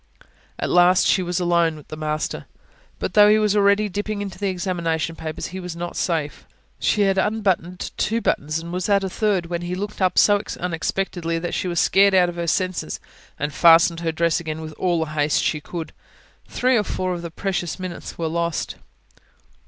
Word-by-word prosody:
At - - -2
last, 180 +1 +5
she 190 - +3
was 175 -1 -2
alone 170 -2 +2
with 150 - -14
the - - -6
master. 155 0 -3 0.5
But - - -4
though 210 0 +7
he 215 - +5
was 210 -1 +2
already 200 +1 +3
dipping 205 +1 -3
into 195 -3 -6
the 200 -1 0
examination 170 -3 -2
papers, 155 -1 -5
he 190 - -4
was 180 -2 -6
not 175 0 -5
safe. 160 -4 -2 0.3
She 210 - +1
had 195 -1 +3
unbuttoned 190 -4 -1
two 225 +2 0
buttons 155 -7 -1
and 170 +1 -6
was 180 +2 -2
at 200 -1 +3
a 190 - -3
third, 200 -5 0
when 170 0 -4
he 175 +1 -3
looked 205 +2 -5
up 185 -1 +2
so 205 -1 +5 0.2
unexpectedly 175 0 -2
that 175 +1 -4
she 185 - -1
was 175 -1 0
scared 200 0 +4
out 180 -1 +5
of 175 - -7
her 170 0 -2
senses, 185 - -1 0.4
and 145 0 -3
fastened 165 +1 +5
her 165 -1 -1
dress 170 +1 +1
again 160 -1 -5
with 155 -1 -7
all 175 -3 +1
the 155 - -9
haste 150 -1 +1
she 150 - 0
could. 165 +1 -7 0.5
Three 255 0 +2
or 210 - +2
four 185 -2 -2
of 175 - -5
the 170 - -6
precious 175 -1 -3
minutes 185 -2 -7
were 165 - -2
lost. 170 0 -2
175 Hz, 200 wpm, -22 LUFS, 165-195 Hz, 0.5 s, though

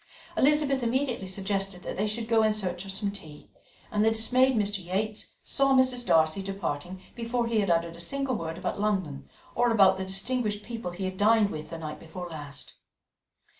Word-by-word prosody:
Elizabeth 280 -1 +3
immediately 245 -3 -1
suggested 195 -1 -2
that - - -5
they 210 +3 0
should 220 +2 -3
go 225 -1 +4
in 215 0 +4
search 185 -3 -2
of 195 - -4
some 200 +1 -1
tea, 155 -7 -9 0.4
and 210 0 +2
the 220 - +5
dismayed 255 +4 +3
Mr. 205 -3 0
Yates 205 +4 -3
saw 275 -1 +3
Mrs. 255 -2 +3
Darcy 160 +3 +3
departing 185 -3 -4
before 235 0 -1
he 230 -1 +1
had 200 -2 +1
uttered 170 0 +1
a - - -12
single 275 +9 -1
word 165 -3 -4
about 185 - -3
London, 185 -10 -1 0.2
or 240 0 +2
about 200 -5 +5
the 190 - -3
distinguished 210 +2 0
people 230 -6 -5
he 180 +2 -5
had 185 0 -4
dined 210 0 +4
with 155 0 -6
the 165 - -6
night 155 -2 -6
before 175 +2 -7
last. 145 -4 -9
200 Hz, 190 wpm, -28 LUFS, 180-230 Hz, 0.4 s, the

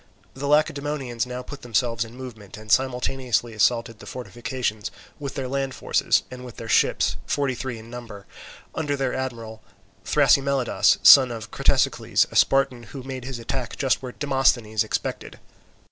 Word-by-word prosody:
The 140 +2 -5
Lacedaemonians 140 -4 0
now 125 0 -5
put 140 +2 -10
themselves 115 -1 0
in 115 +1 -11
movement 110 -6 -10
and 110 0 -8
simultaneously 125 -2 +1
assaulted 115 +1 +1
the - - -12
fortification 120 -2 -4 0.4
with 140 -2 -6
their 135 -2 -3
land 135 0 -2
forces - - +1
and 125 0 -8
with 125 -2 -10
their 115 - -7
ships, - - +2
forty 140 -2 0
three 125 -1 -5
in 115 +1 -12
number, 115 -5 -9 0.5
under 150 -3 -1
their 135 -2 -1
admiral, 115 -4 -5 0.4
Thrasymelidas, 140 -2 +3
son 130 -2 +9
of 115 -3 -7
Cratesicles, - - +2
a - - -10
Spartan, 135 -3 +3 0.2
who 130 - -7
made 130 -2 -6
his 130 -2 -5
attack 120 +2 -4
just 130 -6 +1
where 125 - -6
Demosthenes 130 -6 +1
expected. - - -4
125 Hz, 155 wpm, -24 LUFS, 115-135 Hz, 0.5 s, son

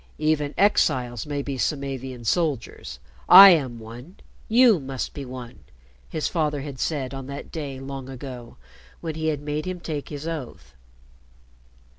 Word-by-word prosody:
"Even 155 -1 0
exiles 130 - +2
may 145 -1 -3
be 135 -2 -4
Samavian 135 -4 -3
soldiers. 145 - -2 0.3
I 195 +2 +12
am 135 -8 +1
one. 120 - -11 0.3
You 230 -4 +6
must 135 -2 -5
be 140 - -6
one," 125 -2 -9 0.5
his 155 - -2
father 150 -4 -1
had 140 -2 -8
said 140 -3 -2
on 135 -1 -7
that 140 +1 -8
day 140 -5 -5
long 135 -1 -7
ago 125 -2 -9 0.4
when 165 -2 -4
he 160 0 -3
had 150 -2 -1
made 150 +1 -3
him 185 -1 -4
take 150 -4 -5
his 145 +1 -6
oath. 120 - -7
140 Hz, 150 wpm, -24 LUFS, 130-155 Hz, 0.5 s, I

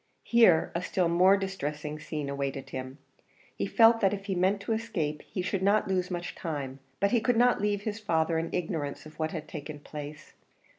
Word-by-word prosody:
Here 225 -9 +5
a 170 - -1
still 180 -1 0
more 180 +4 +5
distressing 155 -6 -4
scene 150 -2 -4
awaited 140 -1 -4
him. 130 +1 -6 0.6
He - - -2
felt 230 -1 +6
that 195 -1 +3
if 195 0 -10
he 200 - -1
meant 190 +3 +2
to 225 - -1
escape 175 -10 -2
he 185 - -5
should 190 +1 -1
not 200 +2 +3
lose 185 -2 0
much 175 -1 -4
time, 140 -5 -5 0.2
but 200 +1 +2
he 235 - +3
could 230 +1 +2
not 245 -2 +4
leave 205 -1 0
his 215 0 -3
father 165 -5 +1
in 165 - -3
ignorance 160 -5 -3
of 155 +1 -13
what 155 0 0
had 160 -1 -6
taken 150 0 -7
place. 150 0 -9
175 Hz, 200 wpm, -29 LUFS, 150-200 Hz, 0.6 s, felt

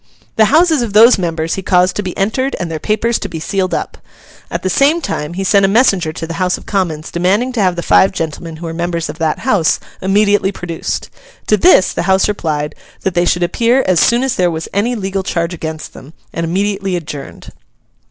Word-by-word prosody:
The 220 - +5
houses 315 +3 +3
of 230 -4 -3
those 225 +1 +7
members 165 -2 -2
he 195 - -3
caused 180 -1 +2
to - - -1
be 185 -3 -6
entered, 260 +8 -1
and 170 -1 -4
their 160 - -3
papers 220 +5 0
to 200 - -5
be 165 -2 -6
sealed 190 +2 -2
up. - - -5 0.5
At - - -4
the - - 0
same 280 - +3
time, 170 - -4
he 195 - -2
sent 200 +1 +3
a - - +5
messenger 195 -7 +2
to 165 - -6
the 165 - -6
House 180 0 +1
of - - -14
Commons 165 -6 -2
demanding 195 +9 +1
to 240 -4 -1
have 185 -2 +2
the 170 - -4
five 190 - +4
gentlemen 165 -1 -5
who 165 +2 -8
were 165 - -4
members 170 0 -3
of 155 - -8
that 160 -2 0
House 205 -11 +1 0.2
immediately 200 +1 +2
produced. 175 -4 -5 0.3
To 215 - +3
this 335 - +4
the - - -2
House 190 0 +3
replied 155 -7 -2 0.3
that 190 - -1
they 175 0 +2
should 175 0 +1
appear 235 +8 +2
as 185 -3 +2
soon 235 +9 +3
as 265 -1 0
there 180 -1 +2
was 160 -1 -4
any 230 +5 0
legal 195 -2 -2
charge 170 -2 -2
against 160 -2 -6
them, 145 +5 -13 0.2
and 165 - -3
immediately 195 +2 -1
adjourned. 150 -5 -7
185 Hz, 220 wpm, -15 LUFS, 165-210 Hz, 0.5 s, those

